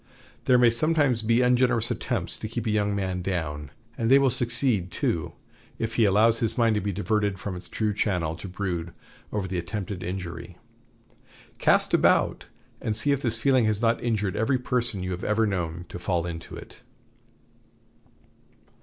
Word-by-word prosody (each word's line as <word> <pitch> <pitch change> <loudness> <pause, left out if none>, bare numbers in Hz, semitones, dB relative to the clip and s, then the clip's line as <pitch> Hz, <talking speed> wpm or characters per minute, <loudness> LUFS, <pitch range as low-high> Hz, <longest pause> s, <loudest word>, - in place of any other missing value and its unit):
There 125 - +5
may 120 -1 +5
sometimes 145 -1 +2
be 115 +3 +2
ungenerous 125 -2 +2
attempts 120 -5 -3
to 110 - -4
keep 115 +1 -4
a 110 - 0
young 105 -1 +1
man 95 -2 -2
down; 80 -6 -3 0.3
and 115 -3 -1
they 135 - +8
will 135 -2 +3
succeed, 120 -6 0
too, - - -2 0.4
if 115 0 -3
he 115 -1 +3
allows 110 +3 +4
his 115 - -1
mind 115 -2 +3
to 105 - 0
be 100 - -2
diverted 105 0 0
from 95 +1 -5
its 90 - -8
true 110 -1 -1
channel 90 -6 -1
to 90 - -8
brood 90 -3 -4 0.4
over 100 -3 -2
the 90 -1 -2
attempted 95 +1 -5
injury. 85 -1 -6 1.0
Cast - - +3
about, - - +3 0.3
and 110 - -1
see 145 +6 +2
if 140 -1 +1
this 115 -3 0
feeling 130 -1 +3
has 105 -1 +1
not 115 0 +1
injured 105 -5 -1
every 110 +5 +1
person 120 -6 -1
you 90 - -3
have 90 +1 -5
ever 110 +1 +2
known 85 -4 -3
to - - -7
fall 90 -1 -1
into 85 -1 -7
it." - - -12
105 Hz, 175 wpm, -26 LUFS, 90-115 Hz, 1.0 s, they